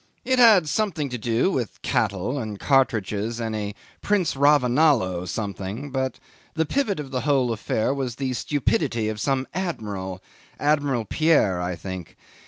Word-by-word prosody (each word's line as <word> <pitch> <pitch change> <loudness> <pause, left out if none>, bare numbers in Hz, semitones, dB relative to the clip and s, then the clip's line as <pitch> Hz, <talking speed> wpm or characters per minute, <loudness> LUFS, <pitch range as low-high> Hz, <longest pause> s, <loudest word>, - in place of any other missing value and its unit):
It 260 -1 +2
had 215 -9 +7
something 160 -5 -1
to 125 - -4
do 115 - +1
with 125 - -3
cattle 100 +9 0
and 110 -4 -5
cartridges 115 -4 +1
and 115 -1 -2
a 105 -1 -4 0.3
Prince 200 -8 +1
Ravonalo 130 - +3
something; 100 +7 -4
but 130 -1 -2 0.4
the 160 - +1
pivot 210 - 0
of 140 -3 -6
the 130 -1 -1
whole 135 -4 +2
affair 110 +3 -1
was 130 -4 -3
the 130 0 -2
stupidity 125 -4 0
of 105 -1 -4
some 135 +1 0
admiral 100 - -4 0.4
Admiral 145 -5 +1
Pierre, 125 - +2
I 90 0 -2
think. 95 -1 -8
125 Hz, 150 wpm, -24 LUFS, 105-150 Hz, 0.4 s, had